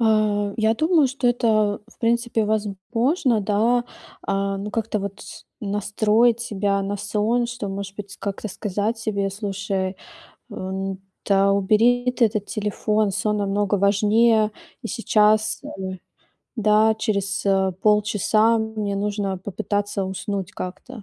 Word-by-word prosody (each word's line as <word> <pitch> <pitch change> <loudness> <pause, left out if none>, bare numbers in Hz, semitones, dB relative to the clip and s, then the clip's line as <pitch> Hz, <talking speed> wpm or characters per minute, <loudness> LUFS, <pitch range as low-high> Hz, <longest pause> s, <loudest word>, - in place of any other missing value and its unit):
А, 215 -2 +2
я 220 0 +2
думаю, 315 +2 +3
что 265 -1 -2
это, 215 -4 +2
в - - -22
принципе, 235 -1 +1
возможно, 220 - 0
да. 225 +4 +2 0.4
А, 195 0 -1
ну 205 +1 -5
как-то, 220 -1 -1
вот, 200 +1 -6
с - - -11 0.2
настроить 215 +3 +2
себя 200 -3 -1
на 200 +1 -2
сон. 215 +3 0
Что 240 -4 -5
может 195 0 -6
быть, 205 -1 -8
как-то, 200 +2 -4
сказать 210 +3 -2
себе: 200 -3 -1
"Слушай, 195 -2 -3 0.6
э, - - -7
н-да, 195 +1 -1
убери 235 +5 +3
ты 245 -1 +3
этот 215 -2 -1
телефон, 210 -1 0
сон 210 +2 0
намного 205 0 0
важнее 215 +2 +3 0.3
и - - -3
сейчас, 215 -2 +2
э. 285 - -8 0.9
Да, 215 0 +4
через, 200 -2 -1
э, 190 -1 +2
полчаса 215 +2 +3
мне 220 -2 -2
нужно 200 -2 -2
попытаться 205 0 -2
уснуть 190 0 -4
как-то". 210 +5 -7
210 Hz, 130 wpm, -23 LUFS, 200-220 Hz, 0.9 s, Да